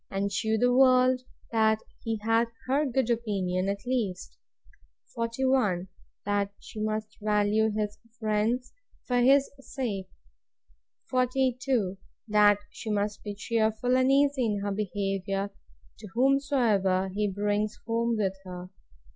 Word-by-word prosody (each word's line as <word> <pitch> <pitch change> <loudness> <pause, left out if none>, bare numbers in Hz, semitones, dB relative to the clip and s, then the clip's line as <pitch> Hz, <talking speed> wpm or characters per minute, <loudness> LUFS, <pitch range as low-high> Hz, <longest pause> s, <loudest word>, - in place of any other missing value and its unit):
And 200 +1 -1
shew 220 +3 +1
the 245 +2 +3
world, 255 0 +5 0.3
that 220 -1 +3 0.3
he 225 -1 -1
had 225 +1 +3 0.2
HER 280 +3 +1
good 255 -1 0
opinion 195 -5 -1
at 200 0 -4
least. 210 - -2 0.8
41. 230 -6 0 0.4
That 200 0 0
she 220 - -10
must 215 0 -3
value 210 +1 +2
his 210 -1 -3 0.2
friends 220 +3 0 0.3
for 245 - 0
his 275 +2 +4
sake. 230 -9 -4 1.0
42. 255 -5 +1 0.3
That 210 -1 +5
she 225 - -7
must 205 0 -1
be 205 -1 -5
cheerful 220 +3 0
and 260 +1 +3
easy 280 -1 +3
in 205 -2 -1
her 205 - -1
behaviour, 195 -1 -2 0.5
to 215 - -9
whomsoever 235 -8 +2
he 210 +1 0
brings 205 +2 -1
home 230 0 0
with 195 -3 0
him. 180 0 -8
215 Hz, 125 wpm, -28 LUFS, 200-250 Hz, 1.0 s, world